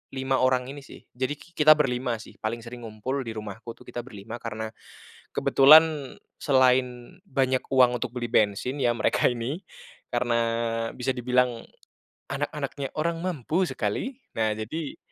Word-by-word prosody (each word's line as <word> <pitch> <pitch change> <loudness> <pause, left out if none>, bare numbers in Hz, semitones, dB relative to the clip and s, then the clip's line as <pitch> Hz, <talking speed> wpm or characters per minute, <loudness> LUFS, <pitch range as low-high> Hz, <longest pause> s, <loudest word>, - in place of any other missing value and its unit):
5 130 0 0
orang 130 0 +3
ini 145 - -8
sih 135 - -14
jadi 130 +4 -2
ki 170 +4 -18
kita 155 +1 +8
berlima 125 -4 0
sih - - -16
paling 115 +1 -3
sering 120 -1 -8
ngumpul 120 +6 -3
di 115 -4 -5
rumahku 110 +2 -7
tuh - - -17
kita 120 - -7
berlima 115 -1 -8
karena 110 -1 -5 0.6
kebetulan 150 -1 +6 0.2
selain 130 +1 +2
banyak 130 -5 0
uang 125 -2 +5
untuk 120 - -3
beli 120 -2 -3
bensin 110 +5 +1
ya 120 -3 +2
mereka 115 - +1
ini, 125 - -1 0.5
karena 120 -1 +1 0.5
bisa 125 +1 -3
dibilang, 125 -1 +1 0.7
anak - - -2
anaknya 140 -1 -4
orang 165 +1 -1
mampu 175 +1 0
sekali 260 -1 -2 0.2
nah 110 -1 +1
jadi, 130 +9 -5
125 Hz, 150 wpm, -26 LUFS, 115-140 Hz, 0.7 s, kita